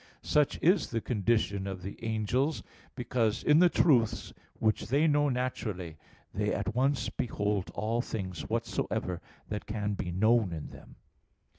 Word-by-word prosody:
Such 150 -1 +2
is 180 +5 +4
the 115 - -1
condition 105 -3 0
of 95 -2 -5
the 100 +4 -8
angels, 115 +7 0 0.3
because 115 -3 0
in 150 +1 +5
the 180 0 +6
truths 125 -11 +2 0.2
which 110 -1 0
they 140 +7 +3
know 145 -2 +3
naturally, 110 - -3 0.4
they - - 0
at - - -2
once 130 0 +1
behold 105 -4 -1
all 115 +2 0
things 95 -7 -5
whatsoever 90 -2 -2 0.3
that 105 0 -4
can 105 -1 -2
be 95 - -3
known 110 +1 +3
in 80 -2 -6
them. - - -14
110 Hz, 145 wpm, -30 LUFS, 100-130 Hz, 0.4 s, the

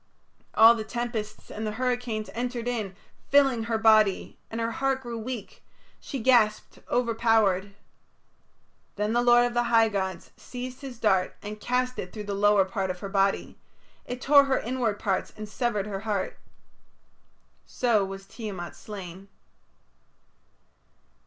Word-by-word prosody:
All 225 +1 +9
the 225 -2 -4
tempests 220 -2 -5
and 220 +1 -4
the 210 - -3
hurricanes 245 -2 -2
entered 240 0 -3
in, 215 -6 -3 0.3
filling 270 -5 +4
her 230 -1 0
body, 215 -3 +3
and 225 - -5
her 230 0 -1
heart 270 +2 -1
grew 235 -2 -5
weak; 225 -2 -7 0.4
she 275 - -6
gasped, 225 -4 +2
overpowered. 225 -5 +2 1.2
Then 210 +2 -1
the 240 - +3
lord 240 0 +5
of 245 - -2
the 240 0 +1
high 230 -1 +4
gods 190 -4 -3
seized 250 +1 -8
his 265 -4 -8
dart 190 -5 +1
and 210 +1 -6
cast 250 +2 -1
it 180 - -5
through 210 - -6
the 205 -1 -4
lower 205 -1 +4
part 190 0 -3
of 180 0 -5
her 195 - -5
body; 195 0 0 0.4
it 250 0 -6
tore 280 +2 +6
her 265 -1 +1
inward 235 -3 -1
parts 195 -2 -1
and 215 0 -6
severed 210 -2 -1
her 200 -2 -4
heart. 210 -2 -3 1.3
So 235 -5 +2
was 195 0 -7
Tiamat 195 -6 -7
slain. 190 -2 -9
220 Hz, 145 wpm, -27 LUFS, 205-245 Hz, 1.3 s, All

